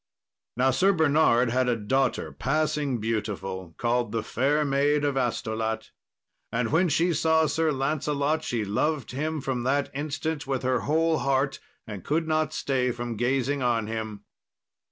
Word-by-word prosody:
Now 130 +1 +3
Sir 190 +9 +3
Bernard 145 -7 +3
had 130 0 +2
a 120 - +2
daughter 130 +5 0
passing 145 -2 0
beautiful, 100 -5 -3
called 120 -1 0
the 115 -1 -1
Fair 145 +7 +1
Maid 145 +1 +2
of 140 -1 0
Astolat, 110 -3 -2 0.6
and 115 0 -1
when 170 +3 +3
she 170 +4 +2
saw 160 0 +3
Sir 160 +1 +1
Lancelot 145 +2 0
she 115 -3 -2
loved 140 +8 -1
him 155 +3 -2
from 130 -2 -2
that 135 +3 0
instant 150 +1 -3
with 135 -2 -1
her 130 0 +1
whole 160 +2 +1
heart, 135 0 0 0.3
and 105 -5 -7
could 160 +2 0
not 155 -1 +1
stay 130 -4 0
from 120 -1 -4
gazing 130 +4 0
on 120 -3 +1
him. 110 -2 -5
135 Hz, 155 wpm, -26 LUFS, 115-150 Hz, 0.6 s, Now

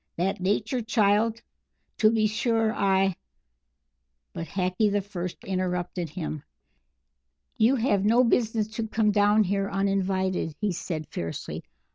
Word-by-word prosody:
That 185 +3 0
Nature 205 +6 0
child? 220 0 +2 0.6
To 215 - +6
be 220 -1 +2
sure. 225 +1 +1
I 195 -1 +2 0.6
" 65 0 -53
But 165 - -5
Hackee 190 +2 0
the 205 - +2
First 185 -3 -5
interrupted 180 -2 -2
him. 155 -2 -5 1.2
"You 230 +5 +4
have 220 -6 +1
no 230 +4 +4
business 225 -3 +1
to 220 +1 -4
come 215 -1 +2
down 205 +1 +4
here 195 +1 -1
uninvited," 190 -4 0
he 210 -2 0
said, 160 -2 -4
fiercely. 85 -1 -5
200 Hz, 130 wpm, -26 LUFS, 180-220 Hz, 1.2 s, To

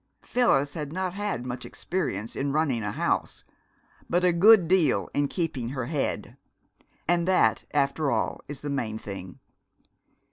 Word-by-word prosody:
Phyllis 145 - +2
had 150 -3 -5
not 185 +1 -2
had 200 - -3
much 125 0 -5
experience 130 - -3
in 140 0 -1
running 145 -6 +1
a 105 - -2
house, - - -1 0.7
but 175 +1 +2
a 180 -1 +4
good 195 +1 +7
deal 180 -3 +2
in 145 0 +1
keeping 140 -8 -2
her 130 -2 -3
head. 140 +1 -3 0.7
And 175 +1 +2
that, 185 - +3
after 140 +1 +1
all, - - -1
is 145 -2 -7
the 145 - -4
main 115 -6 -2
thing. 95 -4 -8
145 Hz, 150 wpm, -27 LUFS, 130-175 Hz, 0.7 s, good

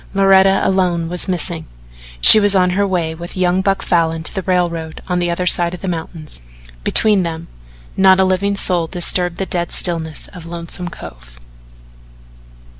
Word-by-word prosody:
Loretta 195 0 +3
alone 180 -3 0
was 180 +2 -1
missing. 170 -3 -3 0.5
She 215 - +9
was 205 -1 +3
on 180 -1 +2
her 200 +2 0
way 170 -4 -2
with 170 +3 -9
young 180 0 +1
Buck 195 0 -1
Falin 165 -2 0
to - - -3
the 190 - -3
railroad 170 -3 -2
on 180 -1 -1
the 175 0 -1
other 170 +1 -3
side 175 0 +2
of 180 - -14
the 195 - -5
mountains. 160 - -6 0.4
Between 210 - +3
them 165 -1 -5 0.5
not 190 0 +4
a - - +4
living 195 +2 -1
soul 175 -4 0
disturbed 175 0 0
the 195 - -3
dead 175 -2 -3
stillness 165 -3 -1
of 175 -3 -12
Lonesome 170 +1 -7
Cove. - - -13
180 Hz, 170 wpm, -16 LUFS, 165-190 Hz, 0.5 s, She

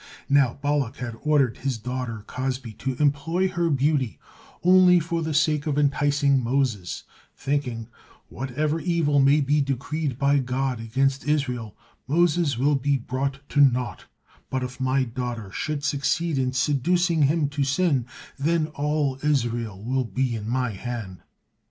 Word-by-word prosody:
Now 140 -4 +3
Balak 145 -3 0
had 120 -3 -5
ordered 145 -6 +2
his 135 -3 -2
daughter 125 -2 -4
Cozbi 130 -2 -4
to 130 +2 -2
employ 150 +7 +1
her 175 -2 0
beauty 140 -4 +1 0.5
only 180 0 +6
for 170 +1 -2
the 160 -2 -2
sake 150 -1 +2
of 145 -2 0
enticing 145 -1 +2
Moses, 120 -7 -1 0.3
thinking, 130 -5 -2 0.4
"Whatever 145 +5 -2
evil 165 -4 +1
may 140 +2 +5
be 145 +2 +2
decreed 140 +1 -2
by 140 0 +3
God 130 -1 -1
against 135 +5 0
Israel, 125 -8 -1 0.3
Moses 165 -2 +2
will 140 +4 +2
be 140 0 +1
brought 135 +3 -4
to 145 - +3
naught, 125 -4 +2 0.4
but 130 -1 -2
if 125 +1 -6
my 130 +1 +2
daughter 120 -4 -5
should 150 +4 -3
succeed 150 +2 0
in 130 -1 0
seducing 160 +6 +1
him 150 +1 +3
to 145 -1 -1
sin, 140 -3 +1 0.3
then 160 +2 +1
all 145 -2 -1
Israel 120 -8 -1
will 130 +2 0
be 120 +3 -1
in 110 0 -5
my 125 -1 0
hand." 105 -3 -6
135 Hz, 145 wpm, -24 LUFS, 125-150 Hz, 0.5 s, only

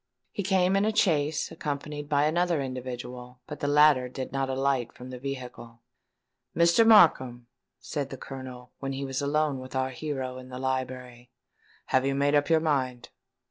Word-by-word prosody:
He - - -3
came 190 -1 +2
in 195 - +3
a 215 0 0
chaise, 155 -7 +1
accompanied 145 0 -5
by 145 0 +3
another 170 +1 +1
individual; 125 -1 -6
but 150 - -8
the 145 - -2
latter 145 -3 +5
did 130 +1 -6
not 135 0 -1
alight 130 -2 0
from 125 +1 -11
the 125 - -7
vehicle. 125 -3 -7 0.8
"Mr. 170 +7 +5
Markham," 130 - +5 0.3
said 145 -3 -4
the 135 - -7
Colonel, 130 -2 -9
when 135 0 -4
he 135 +1 -4
was 135 +1 -3
alone 145 -1 0
with 130 +1 -9
our 130 0 0
hero, 130 -2 -4
in 130 0 -12
the 125 - -7
library, 130 -2 -4 0.6
"have 130 - +2
you 135 0 0
made 140 +1 +2
up 145 0 +2
your 160 -1 +5
mind?" 130 -6 -1
135 Hz, 175 wpm, -27 LUFS, 130-150 Hz, 0.8 s, latter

